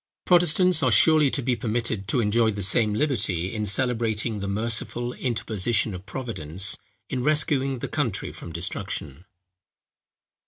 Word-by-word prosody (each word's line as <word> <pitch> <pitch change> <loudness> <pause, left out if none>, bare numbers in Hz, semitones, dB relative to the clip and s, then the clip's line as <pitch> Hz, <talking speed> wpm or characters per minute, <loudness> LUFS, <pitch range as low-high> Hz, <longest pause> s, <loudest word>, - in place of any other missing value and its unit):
Protestants 175 0 +4
are 130 - +3
surely 155 +6 +5
to 135 - -2
be 125 0 +1
permitted 115 -4 -2
to 125 - +2
enjoy 110 +1 +2
the 100 -2 -3
same 105 +3 +2
liberty, 105 - -1
in 105 -1 -2
celebrating 115 -1 0
the 100 - -4
merciful 115 +3 -2
interposition 110 -3 -1
of 90 +1 -9
Providence 95 - -1 0.4
in 130 - -2
rescuing 140 -2 +2
the - - -5
country 125 -11 -3
from 85 - -10
destruction. 85 -2 -4
115 Hz, 135 wpm, -24 LUFS, 100-130 Hz, 0.4 s, surely